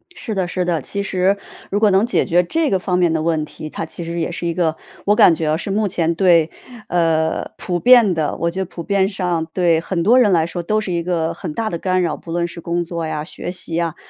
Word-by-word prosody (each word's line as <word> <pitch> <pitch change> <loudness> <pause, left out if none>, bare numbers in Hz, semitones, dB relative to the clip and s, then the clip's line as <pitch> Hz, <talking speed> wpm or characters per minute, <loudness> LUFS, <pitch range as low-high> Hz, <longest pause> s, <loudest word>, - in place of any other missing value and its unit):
是 220 - -5
的 190 -3 -1
是 180 +1 -2
的， 170 -4 0
其 200 +7 -3
实 190 +1 +1 0.3
如 205 - 0
果 215 -1 +4
能 195 +4 +4
解 245 - +1
决 175 -2 +3
这 320 - 0
个 190 - +1
方 180 0 -1
面 175 -2 +3
的 160 - 0
问 160 -1 0
题， 155 0 -8
它 165 - -5
其 165 +2 -7
实 170 +1 -4
也 165 +1 -2
是 170 0 -4
一 170 - -1
个 165 -2 0 0.3
我 205 - +4
感 180 - +7
觉 160 -1 -2
啊， 155 - +1
是 190 - -5
目 205 +1 +1
前 170 -2 0
对 170 -3 +4 0.4
呃， 160 -2 0
普 175 -1 -2
遍 235 -3 +6
的 155 -3 -1
我 170 - 0
觉 185 - -5
得 - - -1
普 170 - -8
遍 195 -1 +1
上 180 -5 -2
对 170 -3 +3
很 170 +1 -2
多 235 +7 +5
人 215 -6 +4
来 165 -3 +3
说 170 +1 -5
都 215 +5 +1
是 215 -4 -4
一 170 -1 -1
个 165 -2 -1
很 150 - -6
大 220 +5 -2
的 170 - -3
干 185 +1 0
扰。 175 - 0
不 165 - -10
论 170 0 0
是 170 0 -10
工 175 +1 -1
作 170 -1 -4
呀， 155 -1 -3
学 175 +1 -6
习 175 -2 -5
啊， 165 -2 -2
175 Hz, 285 characters per minute, -19 LUFS, 165-190 Hz, 0.4 s, 感